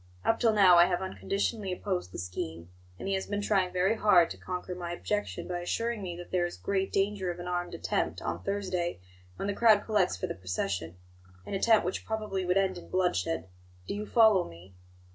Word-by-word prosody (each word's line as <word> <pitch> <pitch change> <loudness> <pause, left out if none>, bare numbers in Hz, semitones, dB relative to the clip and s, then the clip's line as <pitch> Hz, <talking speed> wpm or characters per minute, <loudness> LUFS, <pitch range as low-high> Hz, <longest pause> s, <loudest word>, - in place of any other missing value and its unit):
Up 225 - +2
till 230 - +4
now 195 -4 +7
I 170 - +8
have 180 -1 0
unconditionally 195 +1 -2
opposed 180 - -3
the - - -7
scheme; 85 -2 -5 0.3
and - - -6
he 195 - 0
has 190 0 -2
been 205 0 -2
trying 190 -3 +2
very 185 +4 +2
hard 185 -6 +5
to - - -6
conquer 180 0 -5
my 175 -1 -5
objection 205 +4 -3
by 175 -1 -3
assuring 230 +5 -2
me 175 -3 -5
that 175 - -10
there 175 -1 +2
is 175 - -9
great 195 -1 -1
danger 195 -1 0
of 175 - -4
an 175 0 -7
armed 175 0 -2
attempt - - -1
on - - -3
Thursday 185 - -2 0.4
when 195 - -4
the 200 - 0
crowd 215 -2 +5
collects 200 - +2
for - - -2
the - - -3
procession 90 -2 -3 0.5
an - - -6
attempt 220 +1 +4
which 180 - -2
probably 215 -4 -2
would 180 +1 +2
end 190 -2 +1
in - - -14
bloodshed. 95 - 0 0.4
Do - - -2
you 210 +1 -4
follow 220 -6 +5
me?" 85 +3 -14
185 Hz, 210 wpm, -29 LUFS, 175-205 Hz, 0.5 s, I